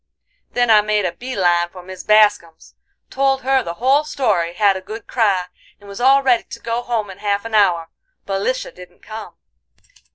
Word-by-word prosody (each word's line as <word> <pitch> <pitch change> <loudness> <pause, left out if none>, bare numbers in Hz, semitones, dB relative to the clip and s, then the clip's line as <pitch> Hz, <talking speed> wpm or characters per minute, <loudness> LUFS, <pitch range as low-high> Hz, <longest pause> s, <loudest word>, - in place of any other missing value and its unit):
"Then 245 -1 +2
I 215 -1 +7
made 210 -1 0
a 175 - 0
bee 255 +5 -7
line 175 -2 +2
for 180 0 -12
Mis 185 0 -9
Bascum's; 205 -6 +2 0.4
told 270 0 +1
her 265 0 +2
the 170 -7 -6
whole 265 +7 +2
story, 215 - -1
had 200 0 +3
a 190 - -5
good 220 +4 -9
cry, 200 -7 +1 0.3
and 205 - -16
was 200 +3 -8
all 270 +2 +5
ready 250 -3 +2
to - - -10
go 230 +1 -3
home 225 -4 -3
in 190 - -13
half 205 0 -1
an 230 - -7
hour, 180 -6 +3 0.4
but 195 0 -2
Lisha 255 +5 -2
didn't 180 0 -15
come. 220 0 -9
210 Hz, 195 wpm, -19 LUFS, 185-245 Hz, 0.4 s, I